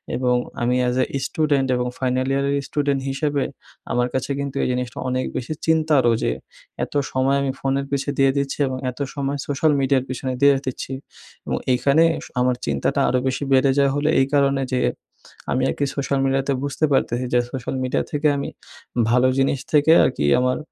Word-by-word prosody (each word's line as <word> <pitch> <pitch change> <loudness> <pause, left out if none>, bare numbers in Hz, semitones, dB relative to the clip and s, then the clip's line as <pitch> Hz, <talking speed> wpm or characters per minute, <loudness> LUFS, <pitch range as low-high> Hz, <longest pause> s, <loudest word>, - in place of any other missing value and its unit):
এবং 125 -1 +1 0.3
আমি 120 +1 +1
as 125 - 0 0.2
a - - -3
student 145 -4 +1
এবং 125 0 -1
ফাইনাল 130 0 0
ইয়ারের 140 +1 +1
স্টুডেন্ট 140 -2 0
হিসেবে 140 0 -1 0.5
আমার 125 0 +1
কাছে 130 +1 -2
কিন্তু 140 -1 -4
এই - - +1
জিনিসটা 125 -1 -3
অনেক 130 0 -1
বেশি 130 +5 -3
চিন্তারও 155 -7 +3
যে - - +1 0.5
এত - - -6 0.2
সময় 135 +1 +2
আমি 135 -1 0
ফোনের 135 0 -1
পিছে 140 0 -1
দিয়ে 135 -1 +4
দিচ্ছি, 140 -1 -1
এবং 130 0 -3
এত 125 - -17
সময় 140 0 -2
সোশ্যাল 145 +2 +2
মিডিয়ার 135 -1 +2
পিছনে 130 0 -3
দিয়ে 140 0 +6
দিচ্ছি 130 0 -4 0.5
এবং - - -1
এইখানে 140 +5 +4 0.4
আমার 125 0 +2
চিন্তাটা 70 -1 0
আরও 125 - +2
বেশি 130 +2 -1
বেড়ে 135 +1 +4
যায় 140 -1 +4
হলে 145 +1 +1
এই 135 - +4
কারণে 140 -1 +2
যে 125 - +1 0.7
আমি 130 +1 +1
আর - - 0
কি 145 - +2
সোশ্যাল 140 0 -1
মিডিয়াতে 135 +1 +1
বুঝতে 145 +2 0
পারতেছি 125 -2 +1
যে 125 - +5
সোশ্যাল 130 0 -4
মিডিয়া 130 - 0
থেকে 150 +1 +1
আমি 140 - -3 0.6
ভালো 125 +2 +4
জিনিস 135 0 +1
থেকে 150 +1 +5
আর - - +4
কি 70 - 0
আমার 125 0 +1
135 Hz, 185 wpm, -22 LUFS, 125-140 Hz, 0.7 s, দিয়ে